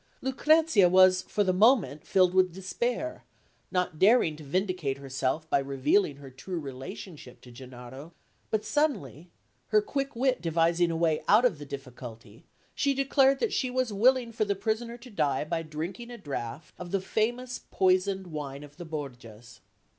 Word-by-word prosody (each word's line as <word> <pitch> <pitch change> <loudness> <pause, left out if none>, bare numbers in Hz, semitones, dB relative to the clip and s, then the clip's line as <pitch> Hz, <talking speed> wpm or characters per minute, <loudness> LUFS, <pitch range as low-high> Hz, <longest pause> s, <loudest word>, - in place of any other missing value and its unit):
Lucrezia 270 - +4
was 185 0 +6
for 205 - -1
the 185 -2 +1
moment 190 - +3
filled 185 -1 +3
with 185 -1 +3
despair, 235 - -3 0.5
not 180 -4 -1
daring 200 -6 +4
to 155 - -11
vindicate 180 -3 -1
herself 135 +3 -2
by 140 - +2
revealing 140 +5 +1
her 140 -1 -12
true 175 +7 -6
relationship 135 +1 -9
to 125 - -15
Gennaro; 130 +4 -11 0.4
but, 215 -1 -1
suddenly, 195 - -1 0.4
her 215 - +4
quick 275 +5 -3
wit 255 +1 +1
devising 170 +1 +2
a 165 - -2
way 160 -2 +1
out 220 +4 +5
of 180 -12 +1
the 145 - -9
difficulty, 125 -5 -10 0.3
she 280 -1 +1
declared 275 0 +3
that 460 - 0
she 255 - 0
was 250 -3 -1
willing 245 +3 +3
for 225 -1 0
the 205 -1 -1
prisoner 225 +4 -2
to 245 +1 -14
die 145 -9 0
by 165 +2 -2
drinking 165 +9 -6
a 240 - -8
draught 140 - -6
of 180 - -7
the 195 - 0
famous 240 +6 -2
poisoned 190 +1 +1
wine 145 -4 -6
of 145 0 -14
the 175 - -8
Borgias. 125 -7 -8
180 Hz, 165 wpm, -28 LUFS, 140-230 Hz, 0.5 s, was